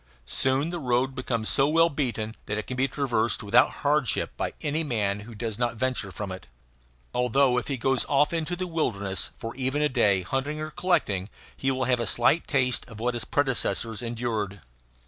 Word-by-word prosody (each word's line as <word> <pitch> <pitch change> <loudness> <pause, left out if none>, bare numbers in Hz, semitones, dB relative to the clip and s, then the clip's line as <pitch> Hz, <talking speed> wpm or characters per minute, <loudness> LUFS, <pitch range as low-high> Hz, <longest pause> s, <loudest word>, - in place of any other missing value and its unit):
Soon 135 - +1
the 175 - -3
road 130 -1 +1
becomes 120 -4 -2
so 135 0 +4
well 165 +2 +4
beaten 120 -6 -2
that 105 - -2
it 105 - -3
can 130 - -5
be 130 +2 +2
traversed 120 -7 0
without 115 +4 +5 0.2
hardship 145 -3 +1
by - - -3
any 155 +2 0
man 105 -8 0
who 110 +2 -10
does 110 -1 -4
not 120 -1 0
venture 120 -4 -1
from 100 0 -5
it 95 -8 -8 0.7
although 125 +1 +3
if - - -8
he 140 - -2
goes 135 +1 +1
off 145 +3 +3
into 165 +1 -1
the 185 +1 -3
wilderness 100 - -1
for 115 - -6
even 135 +3 0
a 150 - +3
day, 100 -8 +3
hunting 135 - -2
or 155 0 -4
collecting, 155 - 0 0.3
he 135 - -1
will 130 -1 0
have 125 -1 +2
a 115 - -1
slight 135 +7 +2
taste 130 -3 +2
of 115 -3 -11
what 120 +2 0
his 120 - -3
predecessors 115 -5 0
endured. 115 -5 -3
125 Hz, 195 wpm, -26 LUFS, 110-140 Hz, 0.7 s, without